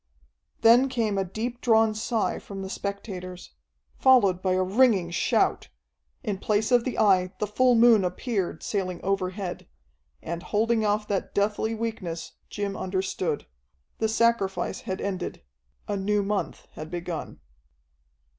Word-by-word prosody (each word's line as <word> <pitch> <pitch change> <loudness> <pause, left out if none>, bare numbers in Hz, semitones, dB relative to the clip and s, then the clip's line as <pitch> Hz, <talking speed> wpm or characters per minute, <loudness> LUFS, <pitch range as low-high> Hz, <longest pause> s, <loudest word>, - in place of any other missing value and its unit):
Then 245 +4 +6
came 225 -6 0
a - - +1
deep 230 +6 -5
drawn 225 -2 +4
sigh 220 +1 -1
from 195 -1 -8
the 190 - -6
spectators, 185 -3 -6 0.5
followed 205 -9 +5
by 185 -1 +1
a 185 0 +2
ringing 195 -3 +3
shout. 170 - +1 0.5
In 200 -3 -2
place 215 +3 0
of 245 -2 +4
the 255 - -3
Eye 185 -3 +3
the 210 - -1
full 250 +4 +3
moon 230 -3 +6
appeared, 185 +1 -2
sailing 185 -4 -2
overhead. 190 -1 -2 0.6
And, 170 +1 -4
holding 220 +4 +1
off 210 0 0
that 200 -2 -2
deathly 210 +2 0
weakness, 215 -7 -4 0.2
Jim 200 -1 -3
understood. 185 -4 -2 0.5
The 220 - +1
sacrifice 225 -4 +1
had 190 0 -4
ended; 185 - -4 0.4
a 205 - -1
new 205 +1 +1
month 205 0 -3
had 155 0 -8
begun.... 175 - -5
200 Hz, 135 wpm, -26 LUFS, 185-225 Hz, 0.6 s, Then